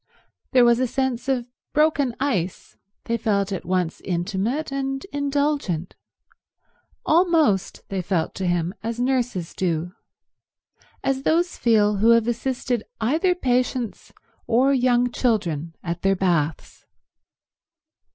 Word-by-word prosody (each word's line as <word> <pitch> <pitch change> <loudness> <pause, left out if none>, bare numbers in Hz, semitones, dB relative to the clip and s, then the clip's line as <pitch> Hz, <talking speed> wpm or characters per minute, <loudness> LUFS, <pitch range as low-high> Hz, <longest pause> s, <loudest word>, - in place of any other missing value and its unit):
There 250 -2 +6
was 235 0 +4
a 255 - +1
sense 260 0 -2
of 250 -3 0 0.3
broken 295 -5 +2
ice; 190 -11 -2 0.3
they 230 0 -1
felt 205 -3 0
at 190 - -4
once 180 -2 -1
intimate 195 - -2
and 270 +1 -3
indulgent; 285 - -1 1.1
almost 320 - +2
they 195 -1 -2
felt 175 -2 -1
to 190 - -3
him 175 0 0
as 230 +1 -4
nurses 245 -9 -1
do—as 180 +8 -6
those 340 +5 +1
feel 210 -3 +3
who 220 +4 +3
have 230 0 -1
assisted 245 0 -1 0.2
either 315 - +2
patients 250 - -1 0.4
or 260 +4 +3
young 245 -1 +2
children 170 - -1
at 170 0 -4
their 195 0 +2
baths. 170 -5 -1
235 Hz, 115 wpm, -23 LUFS, 190-270 Hz, 1.1 s, There